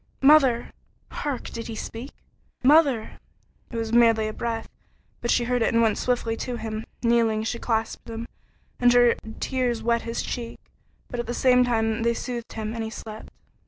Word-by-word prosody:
"Mother!" 270 -5 +5 0.4
Hark! 285 -4 -4
Did 230 -1 -6
he 225 - -5
speak? 230 +4 -6 0.5
"Mother!" 275 -5 +4 0.5
It 235 - -6
was 225 0 -3
merely 230 -2 +5
a 215 - -4
breath, 230 0 -3 0.5
but 235 - -2
she 240 - +3
heard 245 0 0
and 230 0 +2
went 220 -2 +2
swiftly 240 -2 0
to 250 +1 -4
him. 220 -1 -5 0.2
Kneeling, 230 -2 +2
she 235 +1 -3
clasped 225 0 -2
him, 230 +1 -5 0.5
and 245 0 +5
her 245 -1 +6 0.3
tears 245 -3 -1
wet 235 0 +2
his 230 0 -3
cheek, 235 -1 -5 0.5
but 245 - -5
at 240 - -3
the 240 - -3
same 250 -1 +5
time 225 -2 0
they 235 0 +1
soothed 240 -2 -5
him, 220 0 -4
and 230 -1 -3
he 220 - -4
slept. 220 -1 -9
235 Hz, 175 wpm, -25 LUFS, 225-245 Hz, 0.5 s, her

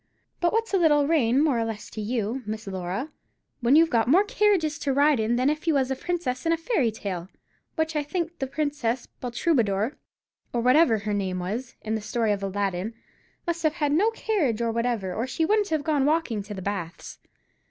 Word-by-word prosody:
But 345 -1 +2
what's 450 -1 -1
a 385 - +4
little 295 -4 +4
rain 275 -4 +3
more 280 -7 +2
or - - +1
less 225 -2 -5
to 215 - -5
you, 225 +3 -2
Miss 215 +1 -4
Laura, 190 - -4 0.5
when 245 +3 +4
you've 325 +1 +5
got 230 -1 +2
more 350 +10 +5
carriages 385 -7 +1
to 280 - -1
ride 285 -1 +4
in 220 +2 +1
than 255 +2 +2
if 305 +3 -1
you 320 - +3
was 265 -1 +1
a - - +1
princess 275 -4 -3
in 330 - +1
a 330 - +2
fairy 325 - +1
tale, 190 -5 -5 0.5
which 320 -1 -1
I 300 - +2
think 335 +3 -3
the 270 - -1
Princess 275 -4 -1 0.2
Baltroubadore, 240 -3 0 0.6
or 240 - +1
whatever 255 +1 +5
her 205 - -9
hard 210 -1 -1
name 190 -2 -2
was, 215 +8 -4
in 220 - -2
the 220 - -1
story 225 +1 0
of 200 -1 -1
Aladdin, 195 +1 -2 0.5
must 340 -1 -2
have 310 -2 +2
had 300 -4 0
no 380 +9 +4
carriage 380 - 0
whatever, 230 -4 -1
or 230 +6 -2
she 320 +5 0
wouldn't 415 +2 +2
have 310 -2 0
gone 295 -3 +1
walkin' 300 -9 +1
to 205 0 -7
the 190 - -6
baths. 185 -4 -5
255 Hz, 210 wpm, -26 LUFS, 215-320 Hz, 0.6 s, you've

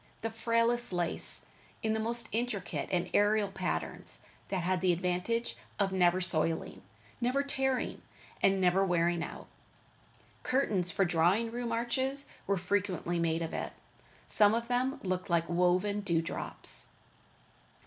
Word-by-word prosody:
The 225 - -2
frailest 230 +1 +1
lace, 175 -2 -2 0.4
in 220 0 +1
the 220 - 0
most 230 +1 -1
intricate 225 -4 -2
and 180 -1 +1
aerial 205 0 +3
patterns, 190 -2 -4 0.3
that 185 -3 -2
had 185 0 +1
the 185 -1 +4
advantage 180 +7 -1 0.2
of 195 -1 +2
never 180 -1 +4
soiling, 165 -2 0 0.4
never 255 +4 +2
tearing, 265 -2 -1 0.4
and 195 0 +4
never 185 +1 +4
wearing 175 -2 +2
out. - - -7 1.0
Curtains 205 -9 +1
for 195 +1 +2
drawing 175 +7 +2
room 240 0 -3
arches 260 +4 0 0.2
were 200 0 +2
frequently 180 -2 -1
made 165 0 +1
of 165 - -5
it. - - -3 0.5
Some 210 0 +4
of 235 +1 -3
them 255 +3 0
looked 185 -1 -2
like 170 -1 +2
woven 180 +4 +2
dew 170 -5 +1
drops. - - -1
195 Hz, 140 wpm, -31 LUFS, 175-230 Hz, 1.0 s, the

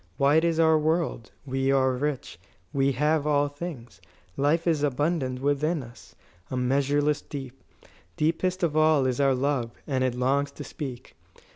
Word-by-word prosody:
"Wide 145 +4 +4
is 165 -1 +1
our 160 -1 +5
world; 155 -6 -1 0.2
we 135 0 0
are 130 -1 +3
rich; 135 +1 -3 0.3
we 135 0 +2
have 150 +3 +1
all 145 -1 +3
things. 145 - -8 0.3
Life 150 +4 +1
is 160 -4 +2
abundant 145 -2 0
within 145 +2 0
us 120 0 -15 0.3
a 130 - -3
measureless 140 +3 +1
deep. 135 -2 -8 0.5
Deepest 180 +4 0
of 160 -3 +1
all 155 -3 +4
is 130 0 0
our 135 -1 +3
love, 130 -2 0 0.2
and 130 -3 0
it 130 -2 0
longs 135 +3 +1
to - - -8
speak. 130 -5 -8
145 Hz, 155 wpm, -26 LUFS, 130-155 Hz, 0.5 s, our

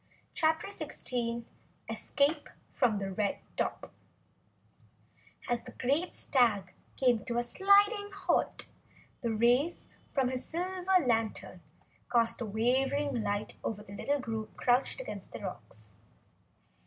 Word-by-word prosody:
CHAPTER 320 +4 +1
16 235 -10 -3 0.4
Escape 280 +7 0 0.2
from 235 -5 +2
Red 195 +1 -1 0.2
Top - - -2 1.5
As 240 -1 +1
the - - -11
great 285 +8 0
stag 210 -8 +3 0.2
came 245 -4 +3
to 235 -1 -2
a 240 - +2
sliding 405 - +4
halt, 395 - 0 0.5
the 235 - -1
rays 240 +9 +2 0.2
from 265 -3 +2
his 255 0 -2
silver 365 0 +1
lantern 225 -3 -1 0.5
cast 230 -1 +3
a 230 - -2
wavering 260 +4 +1
light 205 0 -2
over 210 -2 -3
the 200 - -11
little 285 +8 0
group 225 -3 -5
crouched 250 - +2
against - - -7
the - - -5
rocks. - - -7
245 Hz, 115 wpm, -31 LUFS, 225-305 Hz, 1.5 s, sliding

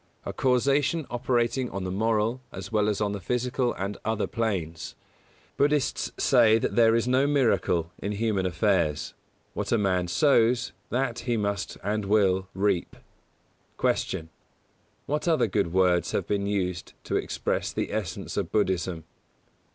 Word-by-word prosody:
A - - -4
causation 140 +5 +2
operating 120 0 0
on 100 - -5
the 90 - -3
moral, 110 +4 0
as - - -8
well 105 -1 +2
as 105 0 -1
on 105 -1 +1
the 100 - -4
physical 125 +5 -1
and 100 +2 -4
other 110 -1 0
planes. 90 -9 -3 0.6
Buddhists 145 -1 +1
say 115 -4 +5
there 115 0 +3
is 115 +1 +1
no 130 +2 +3
miracle 100 - +1
in 100 +2 -3
human 105 -3 0
affairs: 90 -4 0 0.4
what - - -3
a 115 - +4
man 95 -4 +1
sows 120 - +3 0.2
that 120 -1 -1
he 120 -1 -1
must 100 -2 -2
and 105 +1 -1
will 95 -2 +2
reap. 95 -2 0 0.8
173. - - 0
Q. 80 - -15 0.8
_What 150 +4 -1
other 160 - +3
good 95 -5 0
words 90 -1 +2
have - - 0
been 100 -1 -1
used 90 -4 -2
to - - -3
express - - -1
the - - -3
essence 105 -6 -4
of - - -2
Buddhism? 95 -5 0
110 Hz, 150 wpm, -26 LUFS, 95-120 Hz, 0.8 s, say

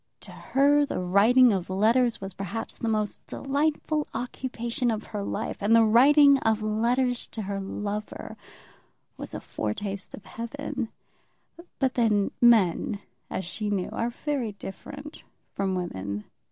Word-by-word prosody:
To - - -11
her 285 +2 +3
the 285 - -2
writing 215 +7 +5
of 185 -2 -2
letters 225 +5 +3
was 195 -1 -7
perhaps 200 +4 -5
the 230 - -1
most 215 -2 -1
delightful 300 +2 -1
occupation 245 0 -2
of 220 -1 -1
her 205 - -2
life, 210 +2 -3
and 210 +3 +4
the 230 - +7
writing 280 +5 +6
of 220 -2 +1
letters 240 +3 +1
to 220 - -6
her 200 0 -3
lover 205 +2 -5 0.8
was - - -7
a - - -3
foretaste 195 - -4
of 200 - -15
heaven; 255 +1 -5 0.9
but 265 -2 +1
then 215 -4 +2
men, 210 -4 +4 0.3
as 190 - -3
she 210 +4 -3
knew, 195 -3 -1
are 230 - -1
very 250 -3 -3
different 285 - -9 0.3
from 195 -1 -1
women. 100 - -4
225 Hz, 140 wpm, -27 LUFS, 200-255 Hz, 0.9 s, the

